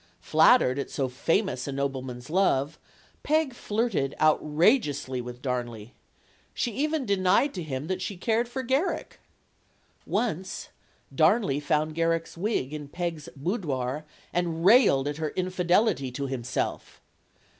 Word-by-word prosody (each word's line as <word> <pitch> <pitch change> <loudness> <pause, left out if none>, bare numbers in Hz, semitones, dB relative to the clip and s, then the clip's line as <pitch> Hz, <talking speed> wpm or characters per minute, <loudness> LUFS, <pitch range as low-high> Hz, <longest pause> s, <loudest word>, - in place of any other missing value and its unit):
Flat 160 - +6
tered 130 +2 0
at - - -3
so 135 -2 -1
famous 130 - 0
a - - -2
nobleman's 135 -2 -4
love, 155 -6 +1 0.4
Peg 305 -2 +1
flirted 210 - -1
out 155 0 +4
rageously 150 - +1
with 125 +1 -9
Darnley. 120 -3 -4 0.6
She 240 - -1
even 300 +4 -1
denied 200 +7 +2
to 180 - -4
him 140 -3 -4
that 185 +2 -3
she 195 0 -4
cared 230 +5 +1
for 260 +2 -4
Garrick. 265 +9 -1 0.9
Once 190 -5 -2 0.4
Darnley 155 - +3
found 150 +1 0
Garrick's 165 0 0
wig 170 - -1
in 150 -1 -6
Peg's 165 0 -4
boudoir 145 - -2 0.3
and 170 -1 -1
railed 200 - +6
at 145 0 -3
her 155 -1 -2
infidelity 180 - +1
to 140 +2 -3
himself. 130 -1 -3
160 Hz, 135 wpm, -27 LUFS, 135-200 Hz, 0.9 s, Flat